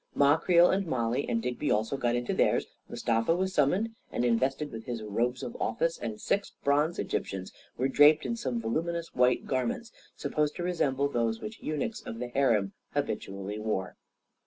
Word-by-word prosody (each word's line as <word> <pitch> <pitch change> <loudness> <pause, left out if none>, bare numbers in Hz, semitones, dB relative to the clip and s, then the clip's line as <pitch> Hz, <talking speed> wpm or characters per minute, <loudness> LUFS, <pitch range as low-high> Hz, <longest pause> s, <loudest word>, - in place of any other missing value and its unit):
Ma 145 +1 +5
Creel 170 +1 +5
and 190 -1 0
Mollie 125 -1 0
and 115 -1 0
Digby 125 +4 -2
also 110 +5 +1
got 120 -3 0
into 120 0 -1
theirs, - - +2 0.2
Mustafa 115 +8 +1
was 190 +1 -1
summoned 185 +11 +2 0.2
and 120 - 0
invested 135 +5 +1
with 110 0 -7
his 120 -3 -4
robes 120 +4 -1
of 120 - -5
office, 165 +10 0
and 110 -3 -5
six 200 - -1
bronze 145 +4 +2
Egyptians 95 -1 -3 0.2
were 130 - +1
draped 150 +3 +6
in 235 - -1
some 130 - -2
voluminous 165 +9 -2
white 125 0 +3
garments 235 - -2 0.2
supposed 150 -1 -1
to 175 - -4
resemble 140 -6 +1
those 115 -4 0
which 220 +1 -8
eunuchs 155 +9 -3
of 115 - -7
the 125 +1 -4
harem 115 -7 +2 0.2
habitually 100 +2 -3
wore. 105 -4 -2
130 Hz, 175 wpm, -29 LUFS, 115-165 Hz, 0.2 s, draped